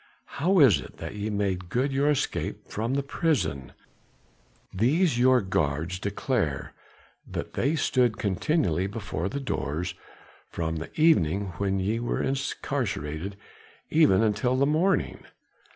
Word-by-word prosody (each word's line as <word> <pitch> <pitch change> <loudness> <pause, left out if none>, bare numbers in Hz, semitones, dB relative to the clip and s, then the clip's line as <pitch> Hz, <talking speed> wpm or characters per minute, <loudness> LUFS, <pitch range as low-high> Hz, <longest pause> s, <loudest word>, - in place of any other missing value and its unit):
"How 190 +5 +3
is 125 - +7
it - - -12
that - - -6
ye 105 +1 -3
made 95 -4 -2
good 130 +7 0
your 140 +2 +2
escape 150 - -2
from 115 +5 -2
the 140 - 0
prison? 135 - -1 1.0
These 135 - +2
your 130 0 +5
guards 80 -1 -1
declare 100 - -2 0.6
that - - -5
they 140 +6 +1
stood 125 -6 +2
continually 95 - 0
before 100 -4 -4
the 140 - -3
doors 90 - -3 0.6
from 80 -1 -3
the 80 - -6
evening 100 - +3
when 95 -1 0
ye 105 +5 0
were 120 - -2
incarcerated 95 - -2 0.6
even 150 -11 +5
until 110 +4 +1
the 140 - +3
morning." 160 +7 +1
105 Hz, 130 wpm, -27 LUFS, 90-135 Hz, 1.0 s, is